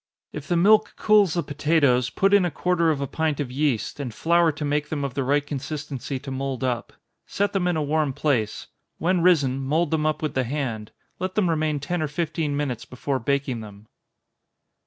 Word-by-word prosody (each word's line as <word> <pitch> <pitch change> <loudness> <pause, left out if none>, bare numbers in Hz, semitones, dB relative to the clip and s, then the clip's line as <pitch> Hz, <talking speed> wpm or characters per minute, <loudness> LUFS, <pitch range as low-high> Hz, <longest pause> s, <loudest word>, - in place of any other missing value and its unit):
If 150 -1 -7
the 175 - +1
milk 215 +5 +4
cools 205 -6 +4
the 170 - 0
potatoes, 145 -4 +2
put 195 +8 +1
in 200 -2 +6
a 175 - +1
quarter 170 +1 +1
of 150 -3 0
a - - 0
pint 155 +1 -1
of 135 -4 -3
yeast, 140 -2 -1
and 135 -4 -4
flour 170 +7 +3
to 150 0 -5
make 150 +1 -1
them 145 -3 -2
of 140 -3 -3
the 135 - -1
right 145 +2 +1
consistency 145 -1 -5
to 135 - -8
mould 135 -1 -3
up. 125 -2 -2 0.3
Set 205 +1 -1
them 185 -3 +1
in 175 -2 +1
a 155 - 0
warm 150 -1 +1
place 130 -7 -1 0.3
when 180 +1 +1
risen, 145 -7 +3
mould 155 +4 0
them 155 -1 +1
up 155 +1 -1
with 150 - -1
the 130 - +1
hand 120 -5 -3 0.3
let 185 +1 -3
them 185 -5 +2
remain 155 -2 0
ten 165 +5 -2
or 155 - 0
fifteen 155 -1 -2
minutes 130 -6 -2
before 130 +1 -3
baking 135 -1 -1
them. 105 -1 -11
145 Hz, 205 wpm, -24 LUFS, 135-165 Hz, 0.3 s, in